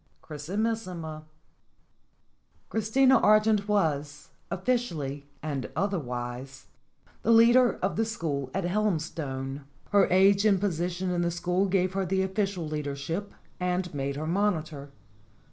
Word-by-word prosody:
X - - -39 0.3
CHRISIMISSIMA 185 -7 -3 1.4
CHRISTINA 255 +4 +4
ARGENT 215 -1 +4
was, 150 -8 -1 0.2
officially 165 - -2 0.2
and 145 -4 -3
other 195 +3 0
wise, 125 +1 -6 0.6
the - - -2
leader 235 +2 +6
of 190 - 0
the 225 - +3
school 145 - -3
at 195 - -2
Helmstone. 155 -8 -2 0.3
Her 205 -1 +5
age 195 +2 +5
and 205 -3 +4
position 180 -1 -1
in 175 -1 0
the 170 - +1
school 180 +3 0
gave 185 -1 +1
her 195 0 0
the 190 +1 +1
official 190 -3 -2
leadership 150 +6 -4 0.3
and 180 -1 -1
made 140 -1 -2
her 150 +2 -4
monitor. 160 -6 -1
180 Hz, 125 wpm, -28 LUFS, 150-205 Hz, 1.4 s, leader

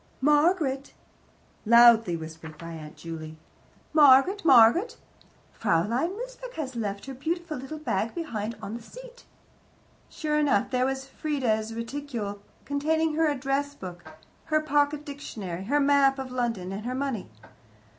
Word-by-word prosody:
"Margaret 295 -1 +2 0.4
" - - -34
loudly 230 -7 +7
whispered 160 0 -9
by 165 +1 -8
Aunt 155 -2 -9
Juley. 160 -1 -8 0.6
"Margaret, 300 +7 +6
Margaret! 275 - +5 0.6
Fraulein 230 - 0
Mosebach - - -8
has 270 -5 -5
left 200 -3 -4
her 270 - -7
beautiful 325 +4 -3
little 270 +5 -7
bag 230 -7 -2
behind 230 -10 -4
her - - -19
on 205 - -6
the 235 - -7
seat." - - -13 0.8
Sure 300 -1 -1
enough, 275 -9 +2
there 255 0 +2
was 270 0 -3
Frieda's 240 -7 -2
reticule, 230 -4 -5 0.2
containing 315 +3 0
her 320 +1 +2
address 285 +1 -1
book, 180 -6 -9 0.4
her 310 -1 +2
pocket 295 -1 +1
dictionary, 200 - -6
her 285 +7 +2
map 280 -1 +4
of 265 -1 -6
London, 230 -7 -2
and 200 +2 -5
her 255 - -2
money. 260 - -3
265 Hz, 140 wpm, -27 LUFS, 215-300 Hz, 0.8 s, loudly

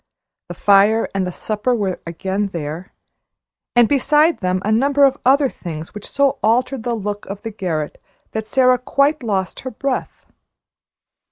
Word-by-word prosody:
The - - -7
fire 205 +3 +4
and 190 -2 -1
the - - -3
supper 215 +6 -1
were 195 -5 -2
again 190 +4 -2
there, 165 +2 -5 0.8
and 240 -1 +6
beside 300 +5 +3
them 185 -1 0
a 215 - +1
number 280 +5 +3
of 275 0 +4
other 275 +2 +4
things 160 -9 -8
which 210 - -8
so 280 -1 +1
altered 250 +3 +1
the 235 +1 -2
look 205 -1 -5
of 200 +1 -7
the 225 - -4
garret 165 -7 -4 0.3
that 220 0 -4
Sara 255 -1 +3
quite 280 +4 +1
lost 195 -6 -2
her 260 - -5
breath. 260 +2 -4
220 Hz, 160 wpm, -19 LUFS, 190-260 Hz, 0.8 s, and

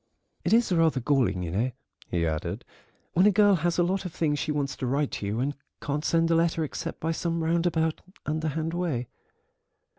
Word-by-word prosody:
"It - - 0
is 230 -2 +4
rather 165 -5 +3
galling, 125 -8 +1
you 85 - -3
know," 115 +8 0 0.4
he 85 -1 0
added, 80 -1 -3 0.5
"when 185 +4 +5
a - - +6
girl 205 0 +5
has 170 +1 0
a 175 - +4
lot 190 +2 0
of 180 - -5
things 150 -3 0
she 155 - -1
wants 140 -3 -1
to 130 - -2
write 140 +3 0
to 100 - -4
you 105 +3 -1
and 140 +3 0 0.3
can't 145 +1 -2
send 165 0 +2
a - - +4
letter 165 0 +2
except 165 +2 -5
by 160 - -1
some 165 0 -1
roundabout, 165 -1 +1 0.2
underhand 155 +1 -1
way." 155 -9 -2
160 Hz, 200 wpm, -27 LUFS, 135-170 Hz, 0.5 s, a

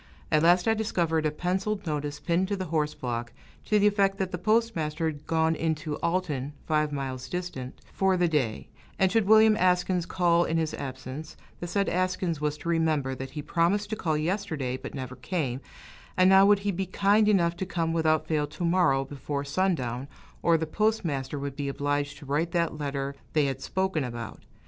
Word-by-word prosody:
At 155 -1 +4
last 175 +3 +4
I 225 - +5
discovered 170 -8 0
a - - +2
penciled 190 +5 -2
notice 150 -2 -3
pinned 175 +4 +1
to 200 - -1
the 190 -1 -4
horse 150 -1 0
block, 120 -1 -4 0.3
to 210 - +3
the 205 - +3
effect 200 -1 +3
that 190 -1 -2
the 180 - -4
postmaster 175 -7 0
had 150 -2 -4
gone 160 0 +2
into 155 -2 -2
Alton 165 -6 -1
(five 155 -1 +1
miles 130 -2 -4
distant) 175 -8 -5
for 190 -1 +2
the 175 -1 +3
day; 135 -9 -1 0.3
and 190 -1 +3
should 220 -1 +2
William 220 0 +7
Askins 180 -1 +2
call 175 -1 +3
in 165 - -1
his 160 -1 -1
absence, 135 +3 -7 0.2
the 175 - -4
said 200 +3 +1
Askins 180 -3 -1
was 150 0 -1
to 170 - -6
remember 155 -5 +1
that 130 0 -6
he 150 - -3
promised 185 +7 +1
to - - 0
call 160 -7 -1
yesterday, 155 -6 -2
but 130 - -7
never 130 -2 -5
came; 130 -1 -3 0.6
and 185 +1 +6
now 195 +1 +7
would 205 0 +6
he 205 - +2
be 190 +1 -3
kind 205 +3 +3
enough 170 -4 +3
to 190 - -2
come 165 -3 -1
without 155 -1 +2
fail 150 -2 0
to 170 +4 -4
morrow 170 -6 +3
before 140 +1 -4
sundown, 140 -6 -1 0.3
or 170 -1 +4
the 160 - -2
postmaster 155 -8 -1
would 140 -1 -4
be 140 0 -3
obliged 145 +1 -1
to 145 - -12
write 150 +5 -1
that 170 -3 0
letter 140 -1 -3 0.2
they 150 -2 +3
had 135 -1 -3
spoken 190 -5 -1
about. 120 -3 -6
160 Hz, 195 wpm, -27 LUFS, 145-185 Hz, 0.6 s, William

